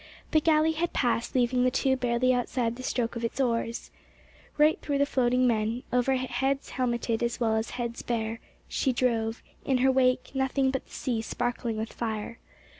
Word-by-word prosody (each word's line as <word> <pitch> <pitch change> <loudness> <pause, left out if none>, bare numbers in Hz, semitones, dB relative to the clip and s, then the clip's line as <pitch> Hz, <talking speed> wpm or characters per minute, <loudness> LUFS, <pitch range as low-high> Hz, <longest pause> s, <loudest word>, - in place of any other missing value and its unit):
The 310 - +4
galley 315 0 +4
had 330 +2 -2
passed, 240 -1 0
leaving 250 0 +2
the 255 - +4
two 265 +1 +1
barely 250 0 +2
outside 245 -1 -1
the 255 - -8
stroke 240 -2 -1
of 235 - -4
its 230 - -3
oars. 230 -2 -1 0.7
Right 300 +1 +4
through 285 -1 -1
the 280 - +3
floating 255 -2 +2
men, 230 +1 0
over 250 +2 +3
heads 260 +2 -1
helmeted 235 -2 -1
as 235 +1 -1
well 225 -2 +2
as 220 +1 -1
heads 235 -1 -3
bare, 230 -1 -2 0.3
she 265 - 0
drove, 230 -2 0 0.2
in 265 - +1
her 265 +1 +4
wake 255 -1 +2
nothing 265 0 +1
but 265 - -4
the - - -22
sea 240 -4 -2
sparkling 240 0 -2
with 220 +1 -4
fire. 220 0 -4
250 Hz, 185 wpm, -28 LUFS, 235-265 Hz, 0.7 s, The